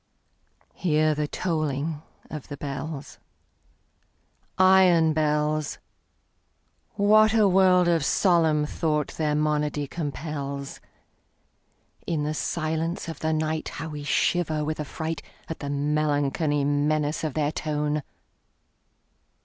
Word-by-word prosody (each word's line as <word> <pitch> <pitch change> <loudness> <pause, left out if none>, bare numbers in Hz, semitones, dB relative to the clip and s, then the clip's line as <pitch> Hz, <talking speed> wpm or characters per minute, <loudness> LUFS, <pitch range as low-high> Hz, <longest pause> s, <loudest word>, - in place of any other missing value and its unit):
Hear 155 -3 +2
the 150 0 -2
tolling 155 -3 -2 0.3
of 155 -3 -8
the 145 - -7
bells, 140 +1 -6 1.4
Iron 185 -4 +5
bells! 150 -1 0 1.2
What 215 +2 +5
a 215 -2 +5
world 185 -1 +4
of 165 -3 +2
solemn 160 -3 +3
thought 150 -1 -1
their 150 -2 -1
monody 150 -1 0
compels! 140 -2 -5 1.3
In 160 -3 -1
the 150 +1 -1
silence 160 +2 -2
of 165 -3 -6
the 160 - -2
nightHow 155 0 -2
we 150 -1 -6
shiver 155 +1 +1
with 155 +1 -3
affrightAt 160 +1 -4 0.4
the 140 - -5
melancholy 145 0 0
menace 145 +2 0
of 155 -3 -3
their 150 -1 +1
tone! 150 -1 -1
155 Hz, 100 wpm, -25 LUFS, 150-165 Hz, 1.4 s, Iron